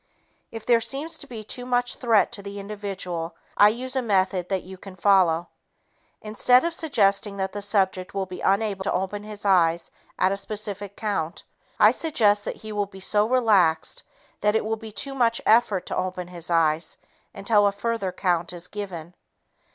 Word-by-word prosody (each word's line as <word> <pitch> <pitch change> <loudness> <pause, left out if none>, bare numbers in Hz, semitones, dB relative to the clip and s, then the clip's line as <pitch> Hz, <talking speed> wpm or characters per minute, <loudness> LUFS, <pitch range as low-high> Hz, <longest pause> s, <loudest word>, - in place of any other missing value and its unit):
If 225 -1 -8
there 235 -1 +4
seems 275 +8 -4
to 285 - -7
be 230 -4 -8
too 245 +4 -5
much 245 0 0
threat 230 -4 +2
to 200 - -4
the 200 0 -7
individual, 195 -5 -5 0.2
I 205 - +7
use 255 +4 -2
a 260 - +1
method 190 -5 +1
that 190 -2 -1
you 190 +1 -10
can 185 0 -12
follow. 175 -3 +3 0.7
Instead 245 +6 +4
of 340 - -1
suggesting 205 - +1
that 190 -1 -2
the 205 - -4
subject 190 -2 0
will 195 -1 -1
be 185 -1 -8
unable 195 -1 +1
to - - 0
open 190 +2 -2
his 210 0 -8
eyes 170 -3 +3 0.3
at 185 - +3
a 195 - -1
specific 205 -1 -5
count, 200 -6 -3 0.4
I - - +7
suggest 210 -10 +2
that - - -3
he 215 - -6
will 205 -1 -1
be 190 -1 -13
so 210 +3 +1
relaxed 205 -11 +3 0.4
that 210 +1 +2
it 220 - +1
will 220 +1 0
be 220 0 -10
too 275 +6 -4
much 235 -3 +2
effort 220 -4 +3
to - - -4
open 185 -1 -3
his 175 -1 -7
eyes 160 -1 +1 0.4
until 205 +1 +3
a - - +2
further 200 -1 -2
count 175 -2 -1
is 175 0 -7
given. 180 -5 -7
200 Hz, 185 wpm, -24 LUFS, 185-220 Hz, 0.7 s, I